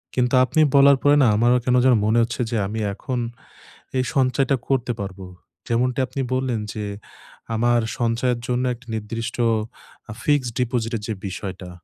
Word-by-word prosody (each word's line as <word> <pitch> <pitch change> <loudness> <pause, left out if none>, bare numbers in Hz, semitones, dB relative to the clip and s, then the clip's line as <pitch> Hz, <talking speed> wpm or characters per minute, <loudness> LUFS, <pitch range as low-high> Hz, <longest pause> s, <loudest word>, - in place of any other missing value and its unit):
কিন্তু 125 0 +1
আপনি 155 +4 -1 0.2
বলার 140 0 +7
পরে 145 0 +5
না, - - +5
আমার 120 +3 +3 0.2
কেন 125 - +3
যেন 130 - +6
মনে 110 +2 +2
হচ্ছে 120 +2 -3
যে, 115 - 0
আমি 110 +3 -4
এখন 125 +5 -4 0.8
এই 130 - +2
সঞ্চয়টা 135 0 +2
করতে 130 -2 0
পারবো। 95 -1 -7 0.4
যেমনটি 125 +2 0
আপনি 135 - -4
বললেন 130 -3 0
যে, 105 -1 -4 0.7
আমার 120 +1 +2 0.2
সঞ্চয়ের 120 +1 0
জন্য 125 0 0
একটা 120 +1 -15
নির্দিষ্ট 115 +2 -4 0.8
আ - - -5
fixed 145 -5 +1
deposit 120 -2 -1
এর - - -9
যে 110 - -2
বিষয়টা, 95 -1 -6
120 Hz, 160 wpm, -22 LUFS, 115-130 Hz, 0.8 s, বলার